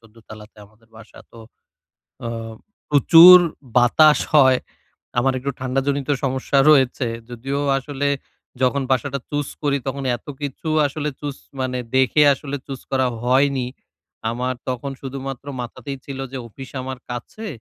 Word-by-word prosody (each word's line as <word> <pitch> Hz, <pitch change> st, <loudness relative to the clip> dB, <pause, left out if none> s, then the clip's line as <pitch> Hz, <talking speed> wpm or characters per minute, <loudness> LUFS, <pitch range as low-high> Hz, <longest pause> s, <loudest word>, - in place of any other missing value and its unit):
১৪ 115 Hz, 0 st, -22 dB
তালাতে 105 Hz, 0 st, -12 dB
আমাদের 110 Hz, +2 st, -27 dB
বাসা 115 Hz, 0 st, -15 dB
তো। 115 Hz, -, -14 dB, 0.9 s
আম 115 Hz, -1 st, -5 dB, 0.4 s
প্রচুর 165 Hz, +5 st, +9 dB, 0.4 s
বাতাস 150 Hz, +5 st, +5 dB, 0.2 s
হয়। 130 Hz, -3 st, +6 dB, 0.6 s
আমার 135 Hz, +2 st, +2 dB
একটু 140 Hz, +2 st, -3 dB
ঠান্ডা 130 Hz, +1 st, -1 dB
জনিত 140 Hz, 0 st, -1 dB
সমস্যা 130 Hz, +1 st, 0 dB
রয়েছে। 130 Hz, -3 st, +3 dB, 0.2 s
যদিও 135 Hz, +4 st, -4 dB, 0.2 s
আসলে 145 Hz, +1 st, -3 dB, 0.5 s
যখন 130 Hz, +2 st, +2 dB
বাসাটা 135 Hz, +2 st, 0 dB
চুস 145 Hz, -1 st, -2 dB, 0.2 s
করি 140 Hz, -1 st, +2 dB
তখন 140 Hz, +1 st, -3 dB
এতকিছু 145 Hz, +4 st, -7 dB, 0.2 s
আসলে 150 Hz, +1 st, -3 dB
চুস 145 Hz, -2 st, -5 dB, 0.2 s
মানে 125 Hz, -1 st, -2 dB, 0.2 s
দেখে 130 Hz, +3 st, +3 dB
আসলে 140 Hz, +1 st, -6 dB
চুস 135 Hz, -2 st, -7 dB
করা 130 Hz, -1 st, +2 dB, 0.2 s
হয়নি। 130 Hz, 0 st, +2 dB, 0.6 s
আমার 125 Hz, +2 st, -2 dB, 0.2 s
তখন 130 Hz, +2 st, -3 dB
শুধুমাত্র 135 Hz, 0 st, -6 dB, 0.2 s
মাথাতেই 135 Hz, +4 st, -7 dB
ছিল 135 Hz, -1 st, -7 dB
যে 135 Hz, -, -5 dB
অফিস 130 Hz, +4 st, -11 dB
আমার 130 Hz, 0 st, -6 dB
কাছে 215 Hz, -, -7 dB
135 Hz, 135 wpm, -21 LUFS, 125-140 Hz, 0.9 s, প্রচুর